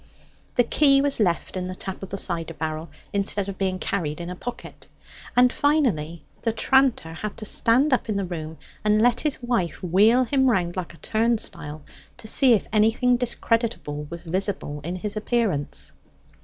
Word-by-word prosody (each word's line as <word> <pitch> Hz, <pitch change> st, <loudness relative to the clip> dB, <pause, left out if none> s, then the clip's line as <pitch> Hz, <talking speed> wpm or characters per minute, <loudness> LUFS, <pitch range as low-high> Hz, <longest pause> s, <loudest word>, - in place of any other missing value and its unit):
The 245 Hz, -, +5 dB
key 275 Hz, +3 st, +5 dB
was 280 Hz, -2 st, +2 dB
left 180 Hz, -4 st, 0 dB
in 180 Hz, -1 st, -3 dB
the 185 Hz, -, -5 dB
tap 190 Hz, 0 st, -6 dB
of 195 Hz, -, -7 dB
the 195 Hz, -, -4 dB
cider 165 Hz, -3 st, -3 dB
barrel, 155 Hz, +1 st, -4 dB, 0.2 s
instead 200 Hz, 0 st, 0 dB
of 195 Hz, -1 st, -6 dB
being 190 Hz, -1 st, 0 dB
carried 165 Hz, -5 st, -2 dB
in 175 Hz, +1 st, -5 dB
a -, -, -5 dB
pocket. 245 Hz, +6 st, -8 dB, 0.5 s
And 250 Hz, 0 st, +6 dB
finally 200 Hz, -, +1 dB, 0.2 s
the 230 Hz, -, 0 dB
tranter 250 Hz, -7 st, +2 dB
had 210 Hz, +5 st, -6 dB
to 215 Hz, -, -5 dB
stand 255 Hz, +7 st, +4 dB
up 245 Hz, -, 0 dB
in 210 Hz, -, 0 dB
the 200 Hz, -, -1 dB
room 160 Hz, -3 st, -6 dB, 0.3 s
and 210 Hz, 0 st, +3 dB
let 235 Hz, +1 st, +3 dB
his 290 Hz, -4 st, -1 dB
wife 190 Hz, -9 st, -1 dB
wheel 210 Hz, +8 st, +4 dB
him 265 Hz, +1 st, +2 dB
round 175 Hz, -6 st, 0 dB
like 180 Hz, -3 st, -5 dB
a -, -, -23 dB
turnstile, 220 Hz, -10 st, -1 dB, 0.3 s
to 220 Hz, -, -9 dB
see 255 Hz, +2 st, +5 dB
if 215 Hz, -, +1 dB
anything 225 Hz, +4 st, +3 dB
discreditable 230 Hz, -11 st, -1 dB
was 170 Hz, +1 st, -7 dB
visible 180 Hz, -4 st, -2 dB
in 175 Hz, +4 st, -4 dB
his 205 Hz, +3 st, -4 dB
appearance. 215 Hz, -, -1 dB
200 Hz, 180 wpm, -24 LUFS, 170-240 Hz, 0.5 s, And